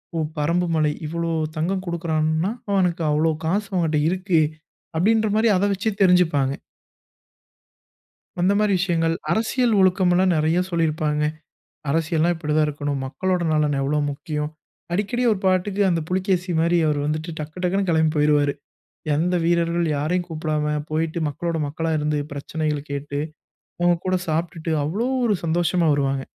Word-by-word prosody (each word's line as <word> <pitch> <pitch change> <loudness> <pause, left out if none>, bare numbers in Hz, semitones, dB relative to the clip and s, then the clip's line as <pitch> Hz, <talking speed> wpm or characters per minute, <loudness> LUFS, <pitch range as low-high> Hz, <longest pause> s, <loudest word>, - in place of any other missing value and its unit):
"ஓ, - - -1 0.2
பரம்புமலை 165 -1 +1
இவ்வளோ 170 +1 -2 0.2
தங்கம் 185 +4 -1
குடுக்கறான்னா, 160 +1 0 0.2
அவனுக்கு 180 -4 +1
அவளோ 155 +2 +2
காசு 200 +4 0
அவன்கிட்ட 160 -4 +1
இருக்கு!" 185 -2 +1 0.6
அப்படின்ற 220 +6 +3
மாரி, 225 +1 +3
அதை 195 - +1
வச்சே 205 +3 -1
தெரிஞ்சுப்பாங்க. 165 -8 +3 1.9
அந்த 190 +3 +3
மாரி 210 -1 +2
விஷயங்கள், 165 -3 +1 0.2
அரசியல் 230 +2 +1
ஒழுக்கம் 185 -1 +3
எல்லாம் 185 +1 +3
நெறைய 160 +3 +2
சொல்லி 165 -2 +1
இருப்பாங்க. 150 -1 -1 0.7
அரசியல்னா 165 +2 +1
இப்படித்தா 155 -1 0
இருக்கணும். 145 -2 -3
மக்களோட 180 +6 -1
நலன் 150 -2 +2
எவ்வளோ 145 +2 0
முக்கியம். 150 +1 -4 0.4
அடிக்கடி, 210 +6 -1
ஒரு 205 - 0
பாட்டுக்கு, 190 +2 +1
அந்தப் 165 -3 -1
புலிக்கேசி 185 -1 0
மாரி 170 +1 +3
அவர் 150 -1 +1
வந்துட்டு 155 +3 -2
டக்கு 155 +4 -6
டக்குன்னு 195 +2 +1
கேளம்பி 160 -1 +2
போயிருவாரு. 145 -1 +3 0.6
எந்த 175 +4 +1
வீரர்கள் 170 0 +1
யாரை 155 +6 0
கூப்பிடாம, 155 -2 -1 0.2
போயிட்டு 160 +1 -1
மக்களோட 165 +4 -3
மக்களா 160 +2 -2
இருந்து 150 0 0
பிரச்சனைகளைக் 150 0 -3
கேட்டு, 140 0 -4 0.6
அவங்க 175 0 +4
கூடச் 185 -1 -1
சாப்பிட்டுட்டு, 165 +1 -2
அவ்ளோ 200 +11 -1 0.2
ஒரு 210 - +2
சந்தோஷமா 170 0 +1
வருவாங்க. 135 -1 0
165 Hz, 135 wpm, -22 LUFS, 150-180 Hz, 1.9 s, அவங்க